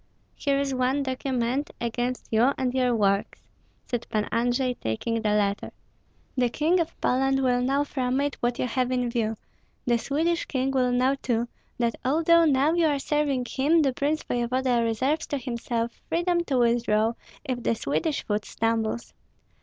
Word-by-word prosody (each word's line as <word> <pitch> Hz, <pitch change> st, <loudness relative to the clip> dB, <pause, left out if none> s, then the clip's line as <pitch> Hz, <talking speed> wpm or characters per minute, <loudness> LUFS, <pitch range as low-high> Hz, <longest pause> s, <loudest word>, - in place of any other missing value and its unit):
"Here 280 Hz, -1 st, 0 dB
is 275 Hz, -1 st, 0 dB
one 260 Hz, +2 st, +1 dB
document 260 Hz, 0 st, -1 dB
against 245 Hz, +1 st, -2 dB
you 235 Hz, +5 st, +4 dB
and 255 Hz, -1 st, -1 dB
your 250 Hz, -2 st, +2 dB
works," 200 Hz, -2 st, 0 dB, 0.4 s
said 240 Hz, -2 st, -3 dB
Pan 210 Hz, -1 st, 0 dB
Andrei, 245 Hz, +2 st, +1 dB
taking 225 Hz, -, -2 dB
the 215 Hz, -, 0 dB
letter. 205 Hz, -1 st, 0 dB, 0.6 s
"The 250 Hz, -2 st, +2 dB
King 320 Hz, +8 st, +2 dB
of 335 Hz, -1 st, -3 dB
Poland 270 Hz, +1 st, +2 dB
will 245 Hz, -1 st, +2 dB
know 275 Hz, +3 st, +2 dB
from 260 Hz, -2 st, -1 dB
it 285 Hz, 0 st, 0 dB
what 240 Hz, 0 st, 0 dB
you -, -, 0 dB
have 250 Hz, +1 st, 0 dB
in 250 Hz, -1 st, 0 dB
view; 225 Hz, -2 st, 0 dB, 0.5 s
the 240 Hz, -1 st, +2 dB
Swedish 325 Hz, +7 st, 0 dB
King 265 Hz, -1 st, -1 dB
will 255 Hz, -2 st, +2 dB
know 255 Hz, +2 st, +3 dB
too, 240 Hz, -3 st, -1 dB, 0.3 s
that 235 Hz, -1 st, +1 dB
although 330 Hz, +5 st, +4 dB
now 290 Hz, +1 st, +3 dB
you 340 Hz, -2 st, +3 dB
are 290 Hz, -2 st, +1 dB
serving 280 Hz, -3 st, 0 dB
him, 305 Hz, +6 st, +3 dB
the 270 Hz, -2 st, +1 dB
prince 295 Hz, +4 st, -1 dB
voevoda 245 Hz, 0 st, 0 dB
reserves 260 Hz, +8 st, 0 dB
to 285 Hz, -, -2 dB
himself 235 Hz, -2 st, -3 dB, 0.2 s
freedom 345 Hz, +1 st, +1 dB
to 270 Hz, -5 st, 0 dB
withdraw 230 Hz, -2 st, +2 dB, 0.3 s
if 255 Hz, -3 st, -2 dB
the 230 Hz, -, +1 dB
Swedish 290 Hz, +5 st, -1 dB
foot 210 Hz, 0 st, -1 dB
stumbles. 225 Hz, 0 st, -1 dB
255 Hz, 170 wpm, -26 LUFS, 235-280 Hz, 0.6 s, you